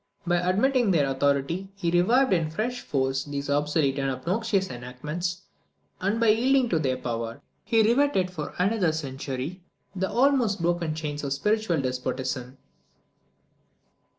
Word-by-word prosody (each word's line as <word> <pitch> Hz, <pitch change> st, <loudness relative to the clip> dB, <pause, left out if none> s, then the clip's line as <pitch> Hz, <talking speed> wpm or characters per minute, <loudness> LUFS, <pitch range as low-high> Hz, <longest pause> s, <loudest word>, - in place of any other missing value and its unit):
By 175 Hz, 0 st, +2 dB
admitting 215 Hz, +7 st, +2 dB
their 160 Hz, -6 st, +3 dB
authority, 140 Hz, +7 st, 0 dB
he 175 Hz, -4 st, -1 dB
revived 220 Hz, +8 st, +4 dB
in 165 Hz, -3 st, +1 dB
fresh 235 Hz, +10 st, -3 dB
force 135 Hz, -1 st, -1 dB
these 145 Hz, -1 st, -4 dB
obsolete 145 Hz, -1 st, +1 dB
and 135 Hz, 0 st, 0 dB
obnoxious 190 Hz, -, -1 dB
enactments; 150 Hz, +9 st, -5 dB, 0.6 s
and, 200 Hz, +4 st, 0 dB
by 230 Hz, -1 st, +4 dB
yielding 250 Hz, +3 st, +3 dB
to 165 Hz, -, +2 dB
their 130 Hz, -4 st, 0 dB
power, 115 Hz, -2 st, -4 dB, 0.2 s
he 225 Hz, -1 st, +3 dB
riveted 235 Hz, -5 st, +2 dB
for 155 Hz, -5 st, -6 dB
another 185 Hz, -3 st, +2 dB
century 140 Hz, +3 st, -5 dB, 0.3 s
the 190 Hz, 0 st, -1 dB
almost 245 Hz, -6 st, +2 dB
broken 170 Hz, -2 st, 0 dB
chains 150 Hz, -2 st, -4 dB
of 140 Hz, -1 st, -1 dB
spiritual 210 Hz, +2 st, +1 dB
despotism. 130 Hz, 0 st, -3 dB
170 Hz, 135 wpm, -26 LUFS, 140-210 Hz, 0.6 s, revived